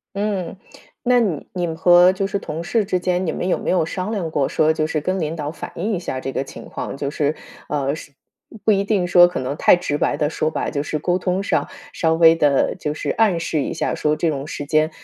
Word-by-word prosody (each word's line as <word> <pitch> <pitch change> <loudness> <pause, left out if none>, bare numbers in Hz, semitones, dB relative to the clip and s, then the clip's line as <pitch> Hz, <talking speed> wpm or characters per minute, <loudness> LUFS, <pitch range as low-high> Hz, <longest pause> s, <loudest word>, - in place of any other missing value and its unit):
嗯， 200 -3 -2 0.5
那 245 0 +4
你 190 -11 -1
你 175 -2 -1
们 165 - -4
和 175 +2 +6
就 195 +1 -2
是 200 - -2
同 160 -2 -5
事 215 +4 0
之 185 -1 0
间， 180 +1 0
你 - - +1
们 180 - -3
有 185 - +2
没 - - -4
有 180 -3 +2
商 185 +5 -4
量 185 -7 -3
过， 140 -3 +1
说 155 0 +2
就 155 -1 -1
是 155 -1 -1
跟 185 +5 -1
领 160 -1 -2
导 150 -2 -4
反 155 - -8
映 210 +6 -2
一 185 - -1
下 135 -7 -4
这 135 - -4
个 135 - -2
情 - - -11
况， - - -6
就 140 0 -3
是， 150 0 0 0.3
呃， 140 -2 0
是 155 - -11 0.5
不 220 - +4
一 200 -1 +2
定 200 -3 +1
说 175 0 +7
可 175 - -4
能 130 +2 -3
太 - - +6
直 160 -4 -2
白 145 - 0
地 150 -1 +1
说 155 0 -1
吧， - - -2
就 140 - -1
是 150 +1 -3
沟 175 +4 0
通 185 +1 -1
上， - - 0 0.3
稍 160 -1 +1
微 165 0 +6
地 145 -4 +2
就 150 - -2
是 155 - -4
暗 210 -6 +2
示 160 -2 -1
一 - - -3
下， - - -1
说 150 0 0
这 160 +2 0
种 140 -1 -4
时 145 - -5
间 155 +1 +2
165 Hz, 275 characters per minute, -21 LUFS, 150-185 Hz, 0.5 s, 说